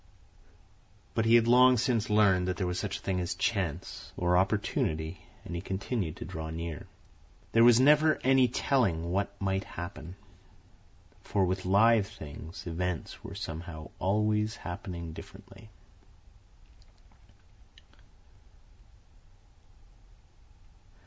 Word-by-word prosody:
But 115 - 0
he 115 +1 +6
had 115 -1 +5
long 125 +1 +6
since 115 -2 0
learned 100 -4 +3
that 90 - -2
there 95 - -1
was 90 0 -2
such - - -3
a - - -14
thing 95 -1 -1
as 90 -1 -2
Chance, - - -3
or 90 0 +2
Opportunity, 90 -4 0 0.3
and 85 - -7
he 85 - -3
continued 95 -2 -3
to - - -8
draw 80 0 -6
near. 80 -1 -6 0.6
There 115 - +5
was 120 0 +7
never 150 +3 +5
any 130 -1 +5
telling 95 -10 0
what 100 +2 -2
might 95 -1 -1
happen, 85 -1 -8 1.1
for 100 -2 +1
with 95 +1 -2
live 105 +2 +4
things 80 -5 -10
events 90 0 -4
were - - -8
somehow 80 -1 -7
always 105 +2 +1
happening 85 -2 -7
differently. 110 +6 -13
95 Hz, 115 wpm, -29 LUFS, 85-110 Hz, 1.1 s, was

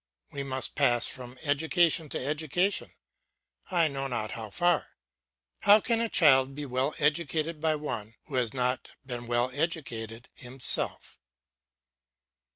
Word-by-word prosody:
We 140 - -4
must 130 -1 -2
pass 120 -1 +3
from 125 0 -6
education 160 +2 +2
to 130 - -3
education, 160 +6 0 0.8
I 170 -4 +3
know 135 -2 -2
not 115 -4 -3
how 110 -2 -6
far. 175 - 0 0.6
How 205 +1 +7
can 230 +1 +1
a 230 - 0
child 135 -6 +4
be 145 0 -5
well 130 +3 -1
educated 155 +1 0
by 160 -1 +2
one 115 -7 -5
who 150 - -14
has 125 -4 +1
not 125 0 -1 0.2
been 120 -2 -5
well 120 +1 +1
educated 125 -7 -3
himself! 125 +1 -1
140 Hz, 135 wpm, -28 LUFS, 125-160 Hz, 0.8 s, How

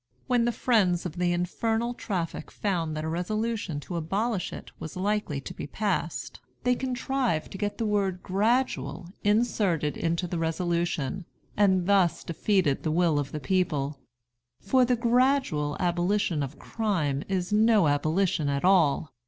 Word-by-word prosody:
When 245 -3 +2
the 240 - +2
friends 195 -9 +2
of 175 -1 -5
the 175 -1 +2
infernal 225 +7 -1
traffic 180 -9 -4
found 165 -6 -2
that 155 - -3
a - - -3
resolution 200 0 -2
to 175 +3 -5
abolish 195 +5 -1
it - - -9
was 160 - -7
likely 200 -6 -1
to - - -7
be - - -6
passed, 180 0 -2 0.2
they 250 +1 +3
contrived 255 - -1
to 195 - -7
get 205 0 -2
the 225 - -1
word 195 -3 0
"gradual" 210 -2 0
inserted 205 -8 +1
into 170 +2 -1
the 175 -1 -3
resolution, 170 -1 -1 0.3
and 190 -3 +3
thus 190 -3 +3
defeated 170 -3 +1
the 160 - -1
will 160 -2 +2
of 140 -1 -3
the 155 - -4
people; 150 -3 0 0.6
for 255 +6 +3
the 250 0 +2
gradual 240 - +2
abolition 175 -1 +1
of 140 +1 -5
crime 170 -11 -1
is 185 0 -1
no 215 -4 +5
abolition 155 +2 +1
at 140 +3 -1
all. 160 -5 +3
185 Hz, 155 wpm, -27 LUFS, 160-215 Hz, 0.6 s, no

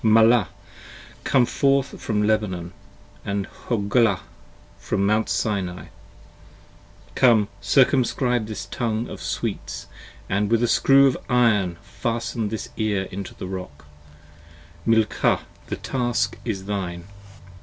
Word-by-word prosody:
Malah, 110 -1 +5 0.8
come 125 -2 +3
forth 135 +2 +1
from 105 -2 0
Lebanon: 100 -5 0 0.5
& 100 0 -2 0.2
Hoglah, 105 -2 +2 0.6
from 100 - -1
Mount 110 +2 +2
Sinai! 95 -5 -2 1.2
5 - - -24
Come, 115 -5 +4
circumscribe 125 +1 +2
this 110 - -5
tongue 115 -1 -2
of - - -8
sweets - - -4 0.3
& - - -23
with 105 +4 +1
a - - +3
screw 135 +3 +5
of 130 -2 +2
iron 105 -8 +3
Fasten 115 +1 -3
this 110 0 -5
ear 105 -3 0
into 100 0 -6
the - - -7
rock: 90 -6 -7 1.0
Milcah, 110 -1 +2 0.3
the - - -3
task 120 -2 -1
is 100 -5 -3
thine! 95 -4 -3
110 Hz, 115 wpm, -23 LUFS, 100-120 Hz, 1.2 s, Malah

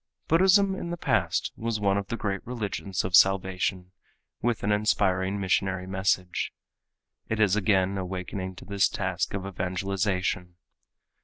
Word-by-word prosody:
Buddhism 190 +4 +5
in 180 -2 -5
the 175 - -3
past - - 0
was 115 -1 -2
one 100 -1 +2
of 100 0 -2
the 115 - -3
great 100 -3 -2
religions 105 -6 -3
of 90 -1 +2
salvation 95 -1 +3 0.5
with 120 -1 0
an 100 - +1
inspiring 100 -2 +1
missionary 95 -1 0
message. 95 -1 -1 0.8
It 110 - -1
is 105 -3 +4
again 95 -2 +2
awakening 95 0 -5
to - - -11
this 100 +1 +2
task 95 -1 -2
of 95 -1 -4
evangelization. 90 -1 -2
95 Hz, 140 wpm, -27 LUFS, 95-105 Hz, 0.8 s, Buddhism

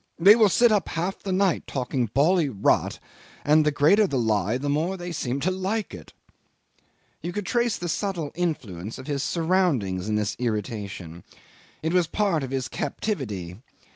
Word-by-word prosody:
They 195 +5 +8
will 220 -3 +5
sit 235 +5 +4
up 205 -5 +1
half 175 +4 -3
the 195 - -4
night 185 -2 +1
talking 125 -2 -1
bally 150 - +2
rot, 100 -6 +1 0.5
and 155 +1 +5
the 150 - +3
greater 160 +9 +4
the 140 - -1
lie 110 -1 +1
the 140 +3 -4
more 160 +7 0
they 175 0 -6
seem 135 -4 -2
to 185 - +1
like 190 - -2
it." 80 -5 -10 1.1
You 175 - -4
could 205 +2 -4
trace 240 -1 +1
the 175 - -4
subtle 175 -3 -2
influence 115 - -3
of 130 - -9
his 140 -2 -2
surroundings 150 - 0
in 105 - +1
this 105 -1 -1
irritation. 100 -7 -4 0.6
It 160 +2 0
was 180 -3 +3
part 195 -4 0
of 135 - -4
his 135 -1 -2
captivity. 105 - -4
150 Hz, 170 wpm, -25 LUFS, 115-185 Hz, 1.1 s, They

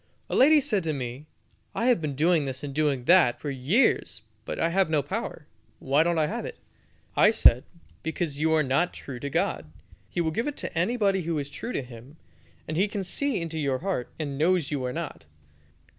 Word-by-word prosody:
A - - 0
lady 300 +4 +6
said 220 - 0
to 155 - 0
me, 130 +2 -6 0.5
"I 230 - 0
have 245 -8 +3
been 150 -3 -3
doing 160 +1 +3
this 135 +1 -4
and 140 -1 -5
doing 145 -4 0
that 170 -5 +5
for 145 - -4
years, 140 - +1 0.2
but - - -4
I 165 - +1
have 185 0 +2
no 150 -3 +1
power; 170 - -5 0.3
why 140 +3 +2
don't 170 +1 +1
I 155 - +3
have - - -3
it?" - - -7 0.6
I 210 - +6
said, 125 - +5 0.4
"Because 160 -2 -3
you 160 0 +2
are 155 - +3
not 140 +7 +1
true 130 -3 -8
to 140 - -4
God. - - -1 0.4
He - - -4
will 160 -2 +1
give 230 - -1
it 295 - -4
to - - -5
anybody 195 +1 +1
who 165 -1 -2
is 145 -1 -4
true 230 - -5
to - - -2
Him, 125 +4 -13 0.5
and 155 - -3
He 195 +4 +3
can 205 -1 -4
see 250 +5 -1
into 165 -1 -4
your 140 -3 0
heart, 180 -6 -3
and 145 -3 -4
knows 170 -2 +2
you 140 -3 -2
are 125 - -2
not." 165 - -6
160 Hz, 215 wpm, -26 LUFS, 140-185 Hz, 0.6 s, lady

